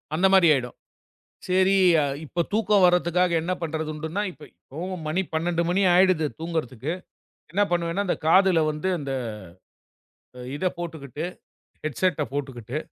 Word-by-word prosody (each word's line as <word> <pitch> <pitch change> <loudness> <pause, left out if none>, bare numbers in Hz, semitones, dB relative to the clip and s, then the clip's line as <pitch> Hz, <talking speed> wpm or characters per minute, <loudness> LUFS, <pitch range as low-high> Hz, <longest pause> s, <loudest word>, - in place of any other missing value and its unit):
அந்த 185 +4 +4
மாதிரி 190 -3 +6
ஆயிடும். 125 -3 -2 0.7
சரி 190 +1 +3 0.5
இப்ப 170 +3 -1
தூக்கம் 210 -2 +3
வர்றதுக்காக 180 0 +2
என்ன 175 +3 -1
பண்றதுன்னுட்டுன்னா, 160 +3 -3
இப்ப 150 - -19
இப்பவும் 170 +4 -7
மணி 175 +5 0
12 170 +1 0
மணி 190 +3 +2
ஆயிடுது 180 -4 +4
தூங்குறதுக்கு. 155 -4 -3 0.6
என்ன 205 +3 +2
பண்ணுவேன்னா, 170 +3 0
அந்தக் 165 - -2
காதுல 185 -2 +5
வந்து 155 +5 -2
இந்த 140 -2 -4 1.4
இதப் 185 +3 -2
போட்டுகிட்டு, 160 -4 -6 0.6
ஹெட்ஸெட்ட 155 +2 0
போட்டுகிட்டு 130 -3 -4
170 Hz, 120 wpm, -25 LUFS, 155-185 Hz, 1.4 s, மாதிரி